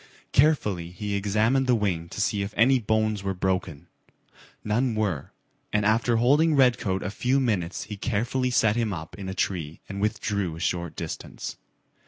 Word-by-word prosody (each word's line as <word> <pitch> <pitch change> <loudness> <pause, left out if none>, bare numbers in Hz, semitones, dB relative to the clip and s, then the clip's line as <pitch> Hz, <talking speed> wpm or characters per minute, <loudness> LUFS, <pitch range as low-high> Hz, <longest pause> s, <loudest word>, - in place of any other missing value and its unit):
Carefully 105 - +2
he 100 +4 -5
examined 110 +7 +2
the 125 - +4
wing 90 -6 -1
to - - -7
see 100 0 +1
if 100 +2 -4
any 130 +3 +5
bones 110 -2 0
were 95 -1 -2
broken. 90 -5 -2 0.8
None 115 +3 +1
were, 100 -10 -1 0.4
and 105 -1 +1
after 115 +2 +3
holding 145 +7 +4
Redcoat 120 -8 +2
a 100 - -3
few 125 +6 +1
minutes 100 -9 -1
he 105 - -7
carefully 120 +4 0
set 110 -3 +3
him 115 -3 0
up 80 -2 -7
in 95 -1 -5
a 95 - -5
tree 85 -5 -2
and 100 0 -5
withdrew 105 -4 -1
a - - -9
short 85 -1 -2
distance. - - -6
105 Hz, 170 wpm, -26 LUFS, 95-120 Hz, 0.8 s, any